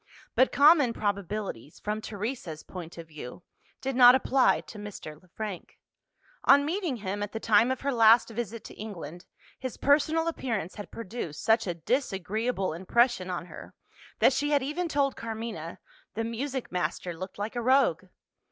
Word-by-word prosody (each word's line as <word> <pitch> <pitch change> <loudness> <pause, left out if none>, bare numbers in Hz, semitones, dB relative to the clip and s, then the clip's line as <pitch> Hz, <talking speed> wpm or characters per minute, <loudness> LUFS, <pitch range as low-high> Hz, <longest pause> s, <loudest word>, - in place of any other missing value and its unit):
But 260 - +4
common 285 -4 +6
probabilities 200 - -3
from 210 +1 -3
Teresa's 205 - -5
point 175 -3 -9
of 165 -1 -8
view 155 +1 -9 0.4
did 270 -1 -2
not 250 0 +9
apply 260 0 +3
to 215 - -11
Mr. 185 -7 -8
Le 185 - -23
Frank. 200 0 -7 0.7
On 285 +1 +6
meeting 340 -3 -1
him, 205 -2 -4
at 205 0 -4
the 225 - -3
time 225 +2 +4
of 260 -1 -2
her 280 0 0
last 230 0 +6
visit 230 0 -5
to - - -10
England, 175 -5 -8 0.3
his 255 -2 -5
personal 310 +3 +3
appearance 225 - -2
had 205 - -8
produced 195 -8 -6
such 225 -1 +3
a 175 - -2
disagreeable 215 - -1
impression 190 +3 +1
on 175 -2 -3
her, - - -11 0.4
that - - +5
she 290 +2 0
had 285 -2 +2
even 320 +6 -2
told 280 -3 +1
Carmina 220 -7 -6 0.4
"the 225 - -1
music 255 +3 -4
master 180 -1 -2
looked 185 +3 -8
like 210 +4 -4
a 240 - -1
rogue." 245 - +3
225 Hz, 165 wpm, -28 LUFS, 185-260 Hz, 0.7 s, not